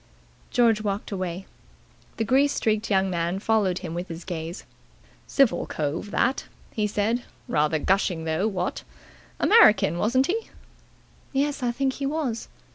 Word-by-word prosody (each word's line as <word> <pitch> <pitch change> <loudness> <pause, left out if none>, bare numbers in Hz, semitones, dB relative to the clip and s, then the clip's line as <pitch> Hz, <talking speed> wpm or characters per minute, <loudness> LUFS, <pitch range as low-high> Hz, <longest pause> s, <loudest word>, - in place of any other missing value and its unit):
George 230 -4 +3
walked 205 0 -3
away. 185 -1 -4 0.7
The 225 - 0
grease 270 +5 +3
streaked 220 0 0
young 190 -2 +2
man 170 +1 -1
followed 205 -3 +1
him 165 - -5
with 175 +2 -4
his 165 0 -8
gaze. 170 0 -5 0.6
"Civil 275 -4 +2
cove, 155 +6 -3
that," 260 +5 0 0.3
he 210 -1 0
said. 215 +4 0 0.3
"Rather 150 +1 +1
gushing 180 0 +1
though, 160 +6 0
what? 185 -4 -2 0.6
American, 215 - +5
wasn't 255 +7 +2
he?" 445 +7 -2 0.8
"Yes. 285 +1 0
I 245 -1 +1
think 265 +2 0
he 275 +1 -3
was." 275 -6 -2
210 Hz, 140 wpm, -25 LUFS, 175-245 Hz, 0.8 s, American